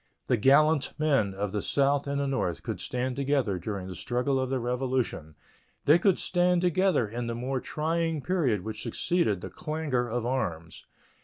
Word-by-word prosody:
The 125 - +2
gallant 140 +5 +4
men 135 -11 +1
of 100 0 -2
the 105 0 -2
South 140 +3 +1
and 140 0 -1
the 140 - 0
North 110 - -1
could 110 -6 -4
stand 125 +5 -3
together 135 -8 0
during 100 +1 -4
the 95 - -6
struggle 125 +8 -1
of 130 -1 -1
the 135 -1 0
Revolution; 125 - -2 0.5
they 150 +4 +6
could 190 +1 +3
stand 180 -1 +2
together 180 - +2
in 120 +3 -4
the 115 - -3
more 130 +3 -2
trying 160 +1 -1
period 140 - +1
which 110 +1 -6
succeeded 110 - 0
the - - -7
clangor 150 -7 -2
of 120 0 -2
arms. 90 -10 -3
130 Hz, 175 wpm, -28 LUFS, 110-150 Hz, 0.5 s, they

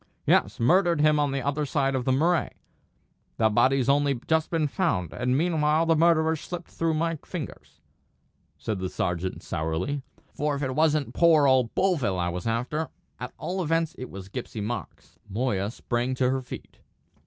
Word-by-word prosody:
"Yes, - - +2
murdered 175 +6 +3
him 150 0 +4
on 145 -1 +1
the 135 -1 -2
other 145 +2 0
side 135 -1 0
of 130 -2 -1
the 130 - +2
Murray; 165 +6 +2 0.9
the 110 -1 +3
body's 130 +4 +3
only 140 -2 +2
just 160 -1 +1
been 165 -2 +1
found; 105 - -1
and 125 +1 0
meanwhile 160 -1 +2
the 165 0 +3
murderer's 160 -1 +3
slipped 175 -1 -7
through 165 -1 0
my 165 +1 0
fingers," 160 0 -8 0.8
said 105 -3 -3
the 95 0 -3
sergeant, 90 +1 -3
sourly; 80 - -2 0.3
"for 150 -1 -1
if 140 - -3
it 130 -1 -1
wasn't 155 -1 +1
poor 160 -4 +5
old 130 -3 +3
Bovill 155 - +1
I 90 -1 0
was 90 +4 -4
after, 125 +8 -1 0.3
at 125 0 -5
all 185 +1 -3
events 165 -1 0
it 130 - -6
was 95 -1 -9
Gipsy 115 +1 -6
Marks." 110 0 -6
Moya 105 -2 -1
sprang 120 +2 -2
to 130 0 +2
her 135 0 -1
feet. 125 - -10
140 Hz, 175 wpm, -26 LUFS, 120-160 Hz, 0.9 s, poor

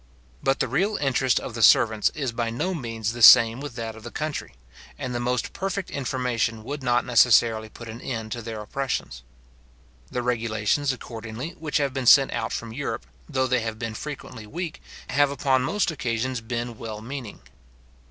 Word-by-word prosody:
But 135 0 +1
the - - +1
real 205 +3 +1
interest 135 -2 +2
of - - -7
the 115 - -4
servants 110 0 +5
is 140 -5 -2
by 115 0 -2
no 155 +12 -2
means 115 - -3
the 120 - -6
same 115 0 +9
with 145 -4 -7
that 115 -2 -5
of 110 - -11
the 120 - -8
country, 145 - -4 0.4
and 125 - -4
the 120 - -1
most 125 +1 -1
perfect 195 0 -3
information 125 -4 -1
would 145 +4 -5
not 120 -1 +2
necessarily 115 -2 +4
put 115 +2 -11
an 115 +2 -8
end 110 -4 -4
to 120 - -3
their 110 -1 -6
oppressions. 110 - -3 0.9
The 125 - -3
regulations, 115 +3 0
accordingly, 115 +3 -6
which 160 -3 -2
have 140 -2 0
been 130 -2 -2
sent 135 +2 +7
out 115 - -2
from 115 -1 -4
Europe, 120 -3 -4 0.2
though 130 -3 +1
they 125 -1 +2
have 110 -1 -4
been 115 -1 -4
frequently 125 -4 -7
weak, 165 +5 -5 0.3
have 145 0 +4
upon 135 -1 +1
most 185 +8 0
occasions 125 -3 -2
been 120 0 -4
well 110 -2 -6
meaning. 125 -2 -7
120 Hz, 180 wpm, -25 LUFS, 115-135 Hz, 0.9 s, same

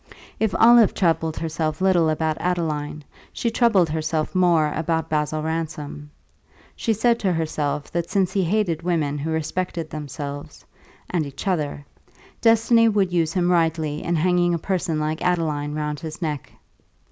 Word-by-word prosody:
If 220 -3 0
Olive 235 -2 +6
troubled 165 -3 +1
herself 155 -1 -2
little 185 -4 +3
about 155 0 -1
Adeline, 155 -4 -2 0.3
she 235 - -2
troubled 225 -7 +3
herself 155 0 -2
more 170 -5 +3
about 160 0 -1
Basil 155 0 0
Ransom; 155 -2 -4 0.7
she 230 - -1
said 230 +2 +2
to 190 - +1
herself 150 -3 -2
that 170 0 -2
since 190 -2 +1
he 195 - +1
hated 175 -3 0
women 155 -5 -1
who 155 +3 -3
respected 160 +1 -3
themselves 145 -1 -7 0.5
(and 175 -3 +1
each 140 +7 -7
other), 150 -5 -1 0.6
destiny 230 0 +5
would 195 -4 +1
use 165 -2 +1
him 180 -1 +1
rightly 160 -3 +1
in 170 - 0
hanging 175 +1 +2
a - - 0
person 175 -2 -1
like 155 +1 -2
Adeline 155 -5 -1
round 150 -1 -3
his 160 -1 -7
neck. 150 -6 -4
165 Hz, 150 wpm, -23 LUFS, 155-180 Hz, 0.7 s, Olive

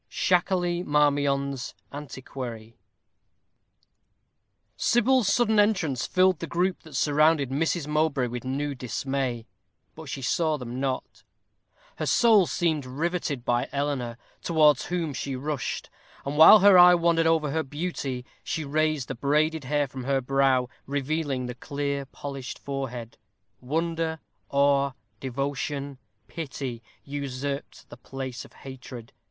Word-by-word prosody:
SHAKERLEY 175 -1 +1
MARMION'S 140 -3 +1 0.2
Antiquary. 125 -5 -7 2.0
Sybil's 240 -3 +3
sudden 220 -3 +3
entrance 180 - +1
filled 185 -2 +3
the 165 - -5
group 180 +2 0
that 155 -3 -12
surrounded 150 0 +3
Miss 160 +2 0
Mowbray 150 -3 +1
with 120 0 -5
new 140 +3 -2
dismay. 130 -1 -3 0.5
But - - -10
she 135 - -5
saw 155 +4 +1
them 125 -1 -6
not. 130 -1 -3 0.8
Her - - -2
soul 220 -7 +5
seemed 160 -4 0
riveted 150 -2 -2
by 120 +2 0
Eleanor, 140 -5 -2 0.2
towards 155 -4 +4
whom 170 -4 -2
she 135 +1 -4
rushed; 145 +1 -4 0.3
and 140 +1 -3
while 160 +7 +9
her 195 -2 +8
eye 180 0 +9
wandered 170 -1 +2
over 160 -3 +2
her 160 +2 0
beauty, 145 -4 -4 0.2
she 160 - -3
raised 155 -1 0
the - - -3
braided 150 +3 +1
hair 145 +1 +1
from 130 -1 -8
her 135 0 +2
brow, 135 -1 +2 0.2
revealing 140 -1 -1
the 125 - -4
clear, 140 +2 -3
polished 140 -1 -7
forehead. 125 -4 -6 0.4
Wonder, 165 +4 -1 0.3
awe, 140 -1 +3 0.3
devotion, 140 +1 -3 0.3
pity, 135 -6 -5 0.2
usurped 140 0 -5
the - - -11
place 130 -3 -6
of - - -16
hatred. 125 -3 -10
140 Hz, 125 wpm, -26 LUFS, 130-160 Hz, 2.0 s, while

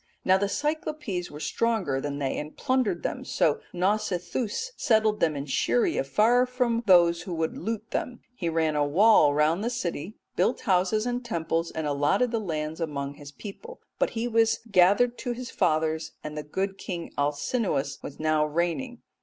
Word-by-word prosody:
Now 190 +1 +5
the 200 0 0
Cyclopes 295 - -2
were 150 - -9
stronger 190 -9 0
than 145 0 -3
they 135 -2 -1
and 150 +1 -8
plundered 255 -10 0
them, - - -3
so 150 - +1
Nausithous 200 - -1
settled 220 -4 +2
them 155 -2 +2
in 140 0 -4
Scheria 120 -2 +1
far 225 - +3
from 250 -2 0
those 170 -2 +5
who 175 0 -5
would 160 0 -1
loot 225 0 -4
them. 245 -1 -3
He 175 -9 -3
ran 160 -1 +1
a 145 - +2
wall 160 +1 +5
round 150 +4 +2
about 215 - -3
the - - +1
city, 195 -5 -4 0.2
built - - +1
houses 195 +2 +2
and 245 0 -2
temples, 165 -5 -1
and 160 - -4
allotted 150 - +1
the 230 - 0
lands 160 -4 -4
among 140 -3 -3
his 145 0 -11
people; 345 - -10 0.2
but - - +2
he 230 +2 0
was 225 -1 +2
gathered 200 +7 +4
to 245 -2 -2
his 250 +1 -7
fathers, 160 -3 0
and 150 0 -6
the 150 - -3
good 190 +6 -3
king 175 -3 -5
Alcinous 145 - -1
was 140 - -9
now 155 -1 +2
reigning. 175 - -2
180 Hz, 180 wpm, -27 LUFS, 155-230 Hz, 0.2 s, Now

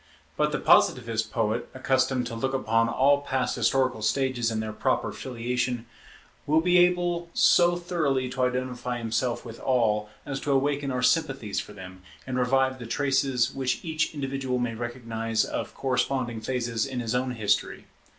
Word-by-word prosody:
But - - +1
the - - 0
Positivist 115 -3 +3
poet, 115 +1 -1
accustomed 130 -1 +1
to 120 - -6
look 130 +4 -1
upon 115 -2 +2
all 140 +4 +3
past 130 -3 -1
historical 130 0 +1
stages 125 0 +1
in 110 -1 -2
their 110 0 -4
proper - - 0
filiation, 125 -1 -3 0.6
will 155 +2 +4
be 180 +2 +4
able 175 -1 +2
so 175 -1 +5
thoroughly 155 -7 -1
to 130 - -3
identify 125 -1 -1
himself 115 +2 -2
with 115 -1 -9
all, 110 -5 +1 0.2
as 135 -1 -4
to 145 - -2
awaken 140 +1 +1
our 125 -1 -2
sympathies 130 -7 +1
for 105 - -7
them, 95 -2 -11 0.2
and 130 -1 -2
revive 130 +1 +2
the 120 - -7
traces 135 -1 +1
which 130 +2 -2
each 160 -1 -1
individual 135 -2 -2
may 120 -2 -1
recognize 115 -2 -2
of - - -5
corresponding 130 -3 -1
phases 120 0 -1
in 130 -2 -4
his 115 -1 -2
own 125 +1 0
history. 105 -3 0
125 Hz, 160 wpm, -26 LUFS, 115-135 Hz, 0.6 s, so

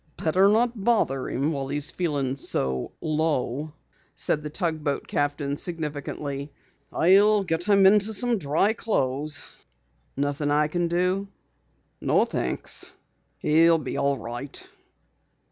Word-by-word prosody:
"Better 185 +5 +3
not 230 0 +1
bother 195 - +1
him 140 +5 0
while 140 -3 -3
he's 145 +2 -2
feeling 145 -7 -1
so 65 - -2
low," 155 -2 -1 0.4
said 150 - +1
the 150 - -5
tugboat 155 -3 -2
captain 145 -1 -1
significantly. 145 -3 -4 0.4
"I'll 200 +4 +4
get 165 -1 -1
him 200 -2 +5
into 210 +2 +5
some 230 +1 +1
dry 155 +8 +2
clothes." 145 - -1 0.7
"Nothing 145 +1 -1
I 150 +1 +2
can 175 +1 0
do?" 180 +3 0 0.7
"No, - - +3
thanks, 65 - -2 0.5
he'll 165 +2 +5
be 140 -5 -5
all 140 0 +1
right." 120 +4 -7
155 Hz, 120 wpm, -25 LUFS, 140-185 Hz, 0.7 s, him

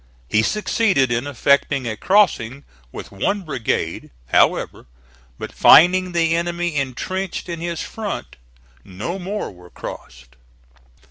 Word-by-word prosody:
He 105 - +2
succeeded 190 - +1
in 120 +4 -1
effecting 140 0 +1
a 110 - -3
crossing 140 - +1 0.3
with - - -9
one 195 - -1
brigade, 140 -9 -3 0.2
however, - - +1 0.5
but - - -7
finding 180 +2 +6
the 165 -1 +1
enemy 170 -1 -2
intrenched 170 +9 -3
in 170 -2 -5
his 170 0 -4
front, 215 -3 -6 0.5
no 105 - -6
more 200 +3 -4
were 90 -1 -16
crossed. 65 -4 -10
165 Hz, 120 wpm, -20 LUFS, 120-185 Hz, 0.5 s, finding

